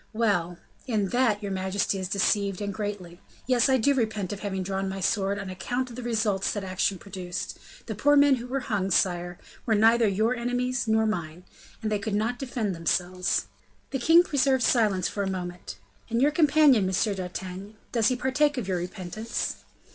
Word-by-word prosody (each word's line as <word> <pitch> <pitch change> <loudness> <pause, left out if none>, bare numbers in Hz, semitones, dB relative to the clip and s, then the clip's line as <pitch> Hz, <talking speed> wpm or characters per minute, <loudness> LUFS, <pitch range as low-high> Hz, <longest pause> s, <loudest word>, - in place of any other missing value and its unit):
"Well, 190 -6 0 0.3
in 210 -5 0
that 230 -3 +1
your 200 - -3
majesty 190 +1 -1
is 185 - -3
deceived, 200 0 +1
and 200 -1 -3
greatly; 195 -4 -5 0.2
yes, 250 0 +3
I 260 - +4
do 270 +4 +3
repent 220 -7 -1
of 200 - -7
having 190 -3 -3
drawn 195 +1 -2
my 195 0 -5
sword 195 +1 0
on 200 -1 -5
account 245 +7 -3
of - - -9
the 250 - -6
results 220 -5 0
that 205 - -4
action 190 +1 0
produced; 185 -1 -6 0.3
the 220 - -4
poor 290 +8 +3
men 285 -2 +5
who 240 +1 -7
were 270 +2 -2
hung, 205 -6 -1
sire, 175 -1 +1 0.3
were 220 - +3
neither 225 +2 +5
your 215 +5 +1
enemies 245 +1 -1
nor 220 0 +3
mine; 175 -5 -3 0.4
and 215 - -1
they 210 - +1
could 205 +1 -2
not 225 +4 -1
defend 240 -7 -2
themselves." 180 +2 0 0.5
The 270 - -2
king 330 +7 +6
preserved 270 -5 +2
silence 210 -8 +2
for 200 - -3
a 195 - -1
moment. 175 - -6 0.3
"And 230 0 0
your 285 +4 +4
companion, 295 - +5
M. 195 +2 0
d'Artagnan, 185 +2 -6 0.2
does 230 -3 +2
he 255 - +2
partake 270 +3 +1
of 230 -6 -3
your 185 -2 0
repentance?" 185 +5 -4
210 Hz, 190 wpm, -26 LUFS, 190-245 Hz, 0.5 s, king